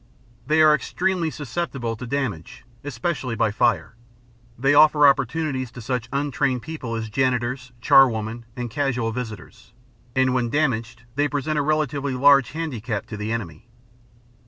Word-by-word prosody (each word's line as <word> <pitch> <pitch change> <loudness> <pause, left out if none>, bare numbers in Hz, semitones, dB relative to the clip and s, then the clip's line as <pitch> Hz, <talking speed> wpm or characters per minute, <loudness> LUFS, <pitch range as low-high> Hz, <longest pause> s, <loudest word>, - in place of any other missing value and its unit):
They 155 +1 +4
are 155 -1 +7
extremely 180 +2 -1
susceptible 140 -5 -4
to 125 +3 -8
damage, 115 - -4 0.2
especially 135 -2 -3
by 110 -1 +1
fire; 110 0 +1 0.6
they 135 +3 +2
offer 150 0 +6
opportunities 140 -1 0
to 125 - -9
such 125 -1 -3
untrained 140 -2 -1
people 145 -7 -5
as 110 -1 -3
janitors, 125 +2 -1
charwomen, 115 -3 +3
and 120 -2 -5
casual 125 -5 -1
visitors; 110 -3 -8 0.4
and, 130 -1 +3
when 125 -2 0
damaged, 120 -5 -1
they 145 +3 +1
present 150 +1 -1
a - - +2
relatively 145 -2 -1
large 140 0 +5
handicap 125 -10 -4
to 105 - -8
the 105 +1 -4
enemy. 115 -3 -5
130 Hz, 140 wpm, -23 LUFS, 115-145 Hz, 0.6 s, are